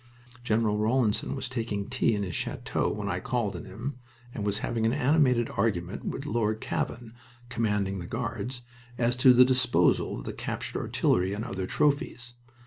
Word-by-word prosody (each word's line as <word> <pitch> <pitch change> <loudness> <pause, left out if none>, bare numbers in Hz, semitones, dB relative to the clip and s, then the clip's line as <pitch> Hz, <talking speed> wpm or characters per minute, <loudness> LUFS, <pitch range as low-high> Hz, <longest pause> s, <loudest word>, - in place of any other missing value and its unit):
General 110 -2 +1
Rawlinson 110 +1 +1
was 135 - -3
taking 115 -5 -3
tea 125 -3 +1
in 100 - -1
his 90 -4 -4
chateau - - -1
when 105 -1 -4
I 90 -2 -1
called 110 -2 -1
on 85 - -7
him, 120 +7 -6 0.3
and 105 - -4
was 100 0 0
having 115 -2 -1
an 115 - +1
animated 135 -4 +3
argument 100 -3 -1
with 135 - -4
Lord 110 -6 0
Cavan, 115 0 -3 0.4
commanding 105 -5 0
the 85 - -6
Guards, 125 +6 -4 0.3
as 120 0 +2
to 130 0 +7
the 125 +1 +8
disposal 125 -9 +2
of - - -8
the - - -4
captured - - -4
artillery 90 +2 +1
and 105 +3 -3
other 95 -6 -4
trophies. 130 -4 0
115 Hz, 170 wpm, -28 LUFS, 100-125 Hz, 0.4 s, the